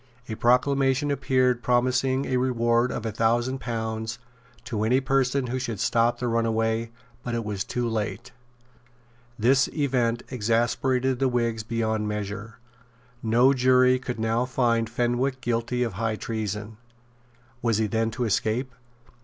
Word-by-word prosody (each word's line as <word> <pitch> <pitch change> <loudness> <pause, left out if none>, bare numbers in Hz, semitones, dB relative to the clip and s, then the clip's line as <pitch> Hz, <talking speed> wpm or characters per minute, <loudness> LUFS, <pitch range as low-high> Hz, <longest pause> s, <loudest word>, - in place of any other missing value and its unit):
A 110 - -4
proclamation 135 +4 +2
appeared 130 -3 +1
promising 125 +3 +1
a 130 - 0
reward 120 -1 +1
of 115 - -4
a 110 - -1
thousand 120 +4 +1
pounds 110 -1 -3 0.5
to 110 -3 -3
any 125 +4 +3
person 135 0 +1
who 125 +1 -2
should 115 -5 -4
stop 120 +2 +2
the 125 - -2
runaway; 115 0 0 0.3
but 120 -1 -3
it 115 -2 -3
was 100 -2 -2
too 120 -1 -2
late. 110 -2 -3 1.1
This 130 +5 +3
event 125 -6 0
exasperated 125 +2 +1
the 135 - +2
Whigs 115 -2 0
beyond 110 -1 -1
measure. 105 +1 -5 0.6
No 120 +4 +4
jury 130 0 +4
could 125 -2 -5
now 115 +2 +1
find 120 -3 +1
Fenwick 120 +3 0
guilty 120 0 -1
of 115 -4 -3
high 110 +2 -1
treason. 105 -1 -4 0.8
Was 115 -3 +1
he 110 - +1
then 110 +2 0
to 115 +3 -3
escape? 115 +3 -1
120 Hz, 140 wpm, -25 LUFS, 110-130 Hz, 1.1 s, No